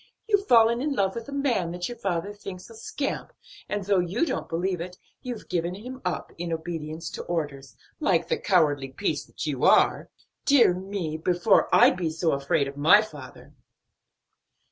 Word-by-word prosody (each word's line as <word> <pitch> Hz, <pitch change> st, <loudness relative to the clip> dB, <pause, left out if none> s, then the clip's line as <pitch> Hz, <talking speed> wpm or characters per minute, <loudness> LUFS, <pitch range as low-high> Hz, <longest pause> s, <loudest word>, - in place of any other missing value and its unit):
You've 405 Hz, -2 st, +2 dB
fallen 235 Hz, 0 st, +5 dB
in 290 Hz, +1 st, 0 dB
love 195 Hz, -6 st, +1 dB
with 230 Hz, +2 st, -7 dB
a -, -, -7 dB
man 260 Hz, -11 st, 0 dB
that 175 Hz, 0 st, -3 dB
your 240 Hz, -, -6 dB
father 195 Hz, +1 st, -2 dB
thinks 195 Hz, -3 st, -9 dB
is -, -, -14 dB
a -, -, -11 dB
scamp 275 Hz, +5 st, -4 dB, 0.4 s
and 205 Hz, -1 st, -2 dB
though 195 Hz, 0 st, +2 dB
you 185 Hz, -, 0 dB
don't 270 Hz, -, -3 dB
believe 175 Hz, +1 st, -1 dB
it, 180 Hz, +1 st, -7 dB, 0.2 s
you've 245 Hz, -4 st, -7 dB
given 175 Hz, 0 st, -2 dB
him 255 Hz, +6 st, -9 dB
up, 180 Hz, -3 st, -3 dB
in 170 Hz, -1 st, -3 dB
obedience 160 Hz, -1 st, -5 dB
to -, -, -6 dB
orders, 140 Hz, -7 st, -4 dB, 0.2 s
like -, -, +1 dB
the -, -, -1 dB
cowardly 145 Hz, -3 st, +2 dB
piece 200 Hz, +10 st, -2 dB
that -, -, -7 dB
you -, -, -3 dB
are. -, -, +4 dB, 0.3 s
Dear 275 Hz, -10 st, +5 dB
me, 185 Hz, -4 st, -4 dB
before 175 Hz, +5 st, +2 dB
I'd -, -, +6 dB
be 175 Hz, -3 st, -1 dB
so 160 Hz, +1 st, 0 dB
afraid 140 Hz, +1 st, 0 dB
of 140 Hz, +1 st, -8 dB
my 165 Hz, +9 st, +6 dB
father!" 215 Hz, -, -12 dB
180 Hz, 185 wpm, -26 LUFS, 165-225 Hz, 0.4 s, I'd